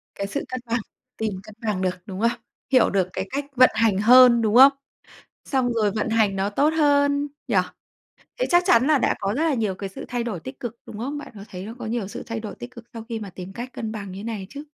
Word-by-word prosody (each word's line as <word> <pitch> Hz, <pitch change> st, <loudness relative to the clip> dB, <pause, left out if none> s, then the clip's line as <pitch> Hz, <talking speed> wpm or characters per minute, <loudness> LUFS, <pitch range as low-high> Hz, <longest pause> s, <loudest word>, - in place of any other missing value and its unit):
Cái 200 Hz, -, -3 dB
sự 195 Hz, -, -3 dB
cân 255 Hz, -, -4 dB
bằng 235 Hz, +1 st, 0 dB, 0.4 s
tìm 220 Hz, -2 st, -2 dB
cân 215 Hz, -, -13 dB
bằng 200 Hz, -3 st, -1 dB
được, 185 Hz, -1 st, 0 dB
đúng 195 Hz, +1 st, -6 dB
không? 235 Hz, +1 st, +1 dB, 0.3 s
Hiểu 255 Hz, -3 st, +5 dB
được 190 Hz, -2 st, +1 dB
cái 190 Hz, +1 st, -3 dB
cách 280 Hz, +1 st, -3 dB
vận 255 Hz, 0 st, +7 dB
hành 220 Hz, -4 st, +2 dB
hơn, 240 Hz, +3 st, +7 dB
đúng 220 Hz, -1 st, +1 dB
không? 270 Hz, +3 st, +9 dB, 0.7 s
Xong 255 Hz, -3 st, 0 dB
rồi 215 Hz, -3 st, +1 dB
vận 215 Hz, +2 st, -2 dB
hành 215 Hz, -3 st, +2 dB
nó 195 Hz, +1 st, 0 dB
tốt 285 Hz, +8 st, +2 dB
hơn 285 Hz, -1 st, +3 dB, 0.2 s
nhỉ? -, -, 0 dB, 0.8 s
Thế -, -, +1 dB
chắc 350 Hz, 0 st, +5 dB
chắn 235 Hz, +2 st, +5 dB
là 300 Hz, -2 st, +4 dB
đã -, -, +2 dB
có 195 Hz, -, -1 dB
rất 310 Hz, -, 0 dB
là 315 Hz, -4 st, +2 dB
nhiều 215 Hz, -5 st, -1 dB
cái 195 Hz, +1 st, -6 dB
sự 190 Hz, -, -9 dB
thay 240 Hz, -1 st, -2 dB
đổi 200 Hz, -8 st, -4 dB
tích 260 Hz, +1 st, -9 dB
cực, 235 Hz, -1 st, -5 dB
đúng 210 Hz, -, -9 dB
không? 280 Hz, +5 st, -4 dB
Bạn 290 Hz, -, -10 dB
có 200 Hz, -, -10 dB
thấy 185 Hz, 0 st, -7 dB
nó 225 Hz, +3 st, -7 dB
có 245 Hz, -, -6 dB
nhiều 220 Hz, -3 st, -2 dB
sự -, -, -7 dB
thay 230 Hz, -1 st, -4 dB
đổi 215 Hz, -, -7 dB
tích 245 Hz, -, -9 dB
cực 235 Hz, -2 st, -12 dB
sau 225 Hz, -1 st, -8 dB
khi 230 Hz, -2 st, -3 dB
mà 200 Hz, -, -7 dB
tìm 180 Hz, +1 st, -9 dB
cách 240 Hz, +4 st, -7 dB
cân 220 Hz, -1 st, -5 dB
bằng 200 Hz, -3 st, -6 dB
như 200 Hz, +3 st, -8 dB
này 215 Hz, -5 st, -4 dB
chứ? 285 Hz, +3 st, -8 dB
230 Hz, 265 wpm, -23 LUFS, 205-255 Hz, 0.8 s, không